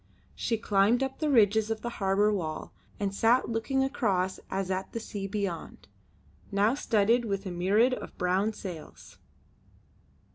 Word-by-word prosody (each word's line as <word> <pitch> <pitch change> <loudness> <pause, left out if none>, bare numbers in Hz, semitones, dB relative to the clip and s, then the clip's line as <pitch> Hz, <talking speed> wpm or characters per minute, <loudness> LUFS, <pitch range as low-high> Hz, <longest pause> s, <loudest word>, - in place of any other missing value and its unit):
She 230 - -1
climbed 210 +4 +2
up 265 0 -4
the 310 - 0
ridges 220 -4 +4
of 220 -1 -2
the 240 - -3
harbour 200 +2 +3
wall 160 -6 -4 0.3
and 200 -1 -1
sat 230 +5 +3
looking 235 +4 0
across 195 -8 0
as 190 -1 -2
at 190 +1 -3
the 230 - -2
sea 205 -3 -5
beyond, 195 -4 -4 0.6
now 205 +3 +3
studded 235 -2 +2
with 200 -2 -3
a 185 - -4
myriad 200 +8 +3
of - - -7
brown 185 +4 +1
sails. 180 -7 -9
205 Hz, 150 wpm, -29 LUFS, 195-230 Hz, 0.6 s, ridges